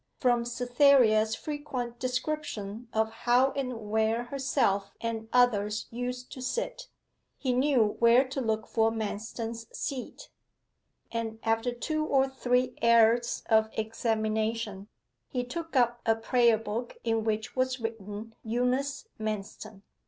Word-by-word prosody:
From 240 -2 +2
Cytherea's 245 -3 +4
frequent 265 -6 -5
description 250 -5 -3
of 220 0 +1
how 245 +4 +3
and 250 -6 -4
where 220 +2 +2
herself 240 -7 0
and 225 -1 -4
others 215 -4 +2
used 250 +1 -4
to 260 - -8
sit, - - -3 0.5
he 255 -3 0
knew 250 -5 +2
where 235 +3 +5
to 270 0 -3
look 220 -2 -1
for 225 -1 +2
Manston's 225 +1 -4
seat; 270 -4 -5 0.8
and 225 -1 -3
after 225 +2 +1
two 310 +6 -2
or 270 -3 +3
three 250 -1 0
errors 235 +1 +4
of 220 -1 +4
examination 220 -2 -1 0.4
he 250 -3 -2
took 325 +6 -6
up 240 -1 +3
a 225 - +3
prayer 235 0 +3
book 225 +2 -5
in 225 -1 +1
which 220 0 -2
was 255 0 0
written 225 -1 -6
'Eunice 250 - -1
Manston. 215 -1 -5
235 Hz, 125 wpm, -29 LUFS, 220-255 Hz, 0.8 s, where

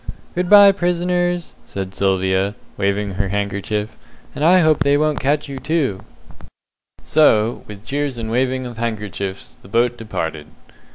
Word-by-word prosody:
"Good 180 0 -2
bye, 205 -1 +9
prisoners!" 175 -1 -1
says 95 -1 -5
Sylvia, 95 +1 0 0.2
waving 100 0 -1
her 100 +1 -2
handkerchief; 100 +2 -2 0.4
"and 145 - -4
I 180 +3 +6
hope 155 -2 +3
they 140 0 +3
won't 155 0 +1
catch 145 +3 0
you, 135 -1 -6
too." 140 - -1 1.0
So, 115 -7 +3
with 105 +1 -11
cheers 140 -2 -2
and 110 -1 -4
waving 130 +1 0
of 120 -2 -8
handkerchiefs, 105 -4 -5
the - - -15
boat 120 +4 +1
departed. 80 -9 -4
120 Hz, 145 wpm, -19 LUFS, 100-150 Hz, 1.0 s, bye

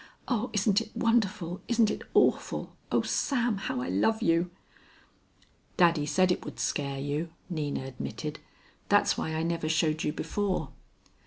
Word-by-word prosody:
O 245 -1 0
isn't 210 0 +3
it 220 -1 -10
wonderful, 205 -6 +1
isn't 230 -3 +3
it - - -4
awful, - - +2 0.2
O - - +3
Sam, 245 -6 +1
how 160 -9 -2
I 125 - -3
love 220 - +2
you. 170 +2 +3 1.3
"Daddy 165 -4 +4
said 185 +4 +3
it - - -1
would - - -8
scare 140 -1 -1
you," 145 +4 -2 0.2
Nina 150 -5 -2
admitted. 70 - -5 0.5
"That's - - +4
why 160 - -2
I 160 - 0
never 165 -1 -1
showed 160 -1 +1
you - - +1
before." 185 -4 -2
170 Hz, 150 wpm, -29 LUFS, 150-210 Hz, 1.3 s, Daddy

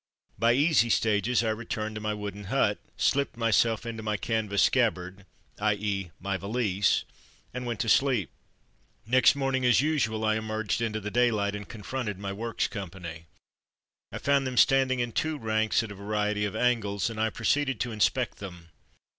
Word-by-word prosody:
By 115 +1 +4
easy 145 -3 +3
stages 110 +2 +2
I 110 - +1
returned 110 -1 -4
to 105 - -6
my 105 0 -2
wooden 105 -1 -6
hut, - - +1 0.2
slipped 140 -3 +1
myself 115 0 +2
into 115 -1 -5
my 105 -1 -1
canvas 105 -3 0
scabbard 95 -6 0 0.2
— - - -28
i. 105 - +2
^., 100 -4 -3
my 95 0 -2
valise 100 -1 +1 0.2
— - - -32
and 125 0 -5
went 115 -4 -3
to - - -2
sleep. 125 - +2 0.7
Next 130 +4 +5
morning, 135 -2 0
as 120 -3 +5
usual, 135 -7 0
I 110 0 +2
emerged 110 -1 -2
into 110 -2 -1
the 105 0 -5
daylight 110 -4 +1
and 105 -1 -8
confronted 110 -1 -4
my 100 0 -5
Works 115 +3 -2
company. 85 -4 -8 0.8
I - - -5
found 140 -1 +1
them 125 -1 -5
standing 130 +1 +4
in 120 -1 -1
two 155 +5 -1
ranks 110 -2 +1
at 110 - -7
a - - -6
variety 105 +1 -1
of 100 - -4
angles 115 -4 0
and 110 -1 -4
I 110 - +2
proceeded 135 +5 0
to 120 - -2
inspect 110 +2 0
them. 90 -4 -9
110 Hz, 180 wpm, -28 LUFS, 100-120 Hz, 0.8 s, Next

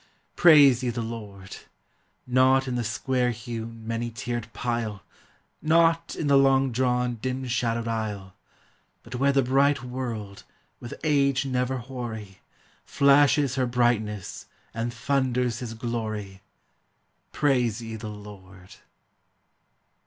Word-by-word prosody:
Praise 145 -7 +7
ye 125 - -1
the 120 0 -3
Lord! 105 -4 -8 0.7
Not 130 +1 +3
in 130 - -2
the 120 -1 -1
square 125 +2 0
hewn, 115 -1 -6
many 115 +1 -2
tiered 115 0 -5
pile, 115 -6 -3 0.6
Not 165 +1 +2
in - - -3
the 140 -1 +5
long 135 -1 +3
drawn, 125 -1 0
dim 130 +1 -3
shadowed 115 -2 -1
aisle, 105 -4 -4 0.7
But - - -11
where 140 +3 +2
the 135 -1 +2
bright 135 +2 +2
world, 120 -6 -6 0.4
with 120 - -8
age 140 -3 +2
never 130 0 -1
hoary, 115 -6 -7 0.4
Flashes 140 -1 +4
her 130 -1 +1
brightness 115 -5 -1 0.3
and 115 +1 -3
thunders 125 -1 0
his 115 -3 -6
glory, 110 -4 -4 0.9
Praise 125 -7 +1
ye 115 -1 -7
the 110 0 -7
Lord! 100 -2 -12
120 Hz, 120 wpm, -26 LUFS, 110-130 Hz, 0.9 s, Praise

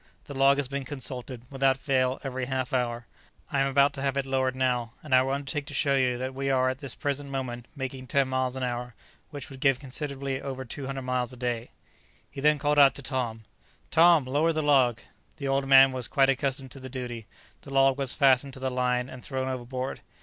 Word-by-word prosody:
The 145 - -8
log 135 +1 +4
has 145 -2 0
been 140 +1 -4
consulted, 130 -2 -5
without 135 -1 +2
fail, 130 -2 0
every 130 -2 -3
half 130 -1 -3
hour. 120 -2 -1 0.5
I 140 - +1
am 135 - +3
about 140 +1 +3
to 135 - -6
have 140 0 -1
it 140 - 0
lowered 130 -1 0
now, 125 -3 0
and 150 -4 -4
I 130 - +7
will 135 +1 -1
undertake 140 +1 -3
to 145 - -7
show 140 -1 +2
you 125 -2 +2
that 130 +1 -4
we 135 +1 -2
are 130 -1 +3
at 130 +1 -4
this 140 -4 -3
present 145 0 -3
moment 125 -3 -4
making 130 -1 -5
ten 140 -1 +2
miles 130 0 -1
an 130 - -3
hour, 120 -1 -3 0.3
which 145 0 -8
would 135 - -10
give 135 -2 +3
considerably 140 0 -4
over 130 -1 -5
200 135 +2 -5
miles 125 -1 -1
a 125 - -11
day." 120 -1 -3 0.6
He 135 - -7
then 150 +1 +4
called 145 +1 +2
out 135 -4 +7
to 140 - -8
Tom, 120 -5 -3 0.5
"Tom, 165 -3 +6
lower 145 +6 +2
the 155 -1 -1
log!" 130 -5 +3 0.4
The 140 - -4
old 135 0 0
man 135 0 +8
was 130 -2 -2
quite 135 -1 +3
accustomed 135 -1 -2
to 135 - -10
the 130 0 -8
duty. 120 -4 -6 0.3
The 140 - -12
log 135 0 +3
was 135 -2 +1
fastened 135 -1 +3
to 130 - -8
the 130 0 -2
line 125 0 0
and 130 -1 -10
thrown 130 -1 -3
overboard. 130 +1 -4
130 Hz, 225 wpm, -27 LUFS, 130-140 Hz, 0.6 s, man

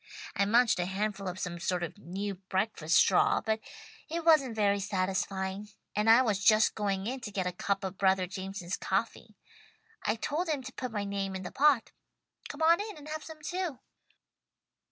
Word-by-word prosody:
I 200 - +2
munched 230 -1 +4
a 175 - 0
handful 200 +1 -2
of 180 0 -4
some 175 -1 -4
sort 180 0 -1
of 175 +4 -6
new 200 +3 -4
breakfast 190 -3 -1
straw, - - +4
but 220 0 -1 0.5
it 335 +1 -3
wasn't 285 -8 +5
very 200 -2 +2
satisfying, 190 0 -2 0.3
and 210 +2 +2
I 235 +3 +8
was 205 -4 0
just 215 0 +5
going 200 -2 -1
in 260 +4 -3
to 230 - -6
get 190 -2 -2
a 180 - 0
cup 195 +3 -2
of 190 0 -5
brother 190 -1 +3
Jameson's 190 -1 -5
coffee. - - -2 0.7
I 215 - 0
told 315 +9 -2
him 290 -4 -1
to 260 0 -8
put 255 - -4
my 205 -2 -2
name 200 -1 -3
in 190 - -5
the 180 - -6
pot. 280 -4 +3 0.6
Come 290 +2 -4
on 335 +4 +5
in 425 -4 -6
and 300 0 -11
have 310 0 -4
some 315 -1 -11
too." 355 -4 -3
205 Hz, 190 wpm, -30 LUFS, 190-255 Hz, 0.7 s, I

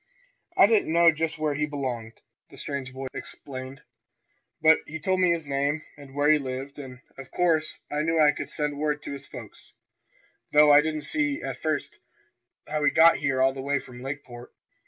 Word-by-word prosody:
"I - - +8
didn't 210 -6 +2
know 170 0 +6
just 160 0 -2
where 155 -1 -1
he 150 +1 -1
belonged," 125 -6 -5 0.3
the - - -15
strange 140 -2 -5
boy 135 +1 -7
explained. 135 +1 -8 0.8
"But 160 0 +5
he 160 +1 -6
told 185 +4 0
me 180 -1 +4
his 170 -2 0
name, 140 +2 -1
and 140 -2 -14
where 145 +1 +3
he 155 - +4
lived, 135 +1 -6
and 130 -2 -10 0.2
of 135 - -10
course 160 -3 +1
I 150 +1 0
knew 165 +1 +1
I 150 -1 +6
could - - -6
send 150 -1 -3
word 150 -1 -1
to - - -6
his 140 0 -9
folks, - - -12 0.8
though 150 0 +7
I 145 - +8
didn't 155 -1 -3
see, 295 - -1
at - - -4
first, 155 -3 -2 0.7
how 150 0 -2
he - - +5
got 165 +1 +6
here 135 -2 +1
all 135 0 +3
the 135 - -6
way 140 +1 0
from 125 -2 -9
Lakeport." 130 -3 -8
145 Hz, 195 wpm, -26 LUFS, 135-155 Hz, 0.8 s, I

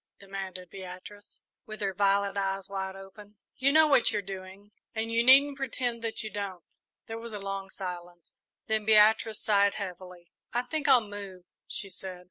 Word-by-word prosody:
demanded 190 -2 -7
Beatrice, 190 +2 -11 0.2
with 215 0 -8
her 195 -1 -1
violet 200 +1 +2
eyes 195 -1 -2
wide 190 -1 -4
open. 195 +2 -13 0.2
"You 275 0 +3
know 315 +2 +7
what 275 -5 +4
you're 210 -2 -1
doing, 195 +1 -9 0.2
and 225 +1 -2
you 230 +1 +3
needn't 275 +3 +6
pretend 245 -3 -2
that 225 -1 -1
you 215 - -5
don't." 195 -4 -5 0.4
There 225 0 -6
was 230 -1 -8
a 210 - -4
long 195 0 -4
silence, 175 -3 -8 0.2
then 220 -1 +1
Beatrice 220 0 +4
sighed 200 -1 +3
heavily. 180 -3 -8 0.2
"I 245 +1 +1
think 310 +1 -2
I'll 240 -5 +6
move," 200 -3 -8 0.2
she 195 -2 -4
said. 185 -1 -8
200 Hz, 170 wpm, -29 LUFS, 190-220 Hz, 0.4 s, know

